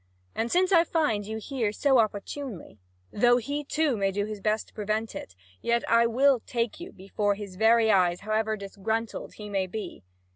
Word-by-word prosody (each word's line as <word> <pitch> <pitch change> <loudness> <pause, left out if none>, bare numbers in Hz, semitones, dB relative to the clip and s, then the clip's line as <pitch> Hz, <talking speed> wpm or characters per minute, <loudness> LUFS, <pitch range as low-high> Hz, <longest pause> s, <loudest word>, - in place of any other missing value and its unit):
And 230 +1 -2
since 370 +2 +3
I 335 -3 +6
find 295 -13 0
you 220 0 -4
here 225 -2 -2
so 265 +3 +3
opportunely, 215 - -3 0.3
though 240 - +4
he 285 +5 -3
too 300 -2 0
may 195 -2 0
do 205 +1 -1
his 215 -1 -7
best 215 +1 0
to - - -28
prevent 215 +1 -2
it, 100 - -8 0.3
yet 235 0 0
I 230 0 +4
will 260 +3 +3
take 235 +2 -3
you 345 - -8
before 200 +2 -1
his 200 -2 -8
very 220 +2 +4
eyes, 180 -3 +3
however 215 +1 -1
disgruntled 215 +3 -4
he 210 - -8
may 195 -2 -1
be." 215 +3 -7
220 Hz, 185 wpm, -27 LUFS, 205-245 Hz, 0.3 s, I